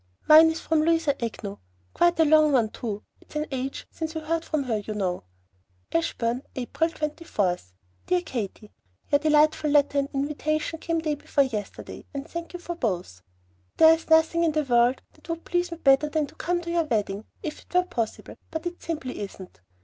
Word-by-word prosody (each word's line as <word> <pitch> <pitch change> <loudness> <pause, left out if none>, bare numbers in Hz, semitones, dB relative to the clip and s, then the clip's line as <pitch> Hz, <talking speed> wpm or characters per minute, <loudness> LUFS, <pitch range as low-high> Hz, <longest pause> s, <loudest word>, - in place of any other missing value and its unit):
"Mine 315 +1 +9
is 320 0 -2
from 315 -1 +1
Louisa 325 -2 +2
Agnew, 215 -3 -4 0.4
quite 345 -1 +3
a 320 - +6
long 310 0 +5
one, 235 -5 +3
too. 210 -2 -5 0.2
It's - - -19
an 300 0 0
age 265 0 -4
since 320 0 -5
we 320 - -2
heard 325 +1 -1
from 310 -3 -1
her, 235 -4 -1
you 210 +1 -5
know." 180 - -2 0.7
ASHBURN, 230 +9 0
April 265 +6 -1
24. 300 - -1 0.5
DEAR 360 -1 +2
KATY, 215 - -5 0.4
Your 285 - +5
delightful 305 0 +3
letter 285 -1 +3
and 280 0 -1
invitation 300 +3 -1
came 330 0 -1
day 310 -2 0
before 290 0 +1
yesterday, 215 -6 -6
and 280 +2 -4
thank 335 0 -6
you 355 - -5
for 345 0 -5
both. 180 - -3 0.6
There 320 0 +8
is 325 0 -4
nothing 320 +1 +4
in 325 -2 +2
the 305 0 +1
world 245 -1 +3
that - - -20
would 330 0 -4
please 350 0 0
me 335 - -5
better 275 0 +4
than 310 0 0
to - - -15
come 350 0 -1
to 340 -1 -5
your 340 -1 +2
wedding 210 -5 -1 0.2
if 305 - -5
it - - -24
were 360 - +5
possible, 240 -12 -4
but 320 +1 -5
it 350 0 -5
simply 300 -6 -4
isn't. 190 - -8
300 Hz, 195 wpm, -26 LUFS, 240-325 Hz, 0.7 s, Mine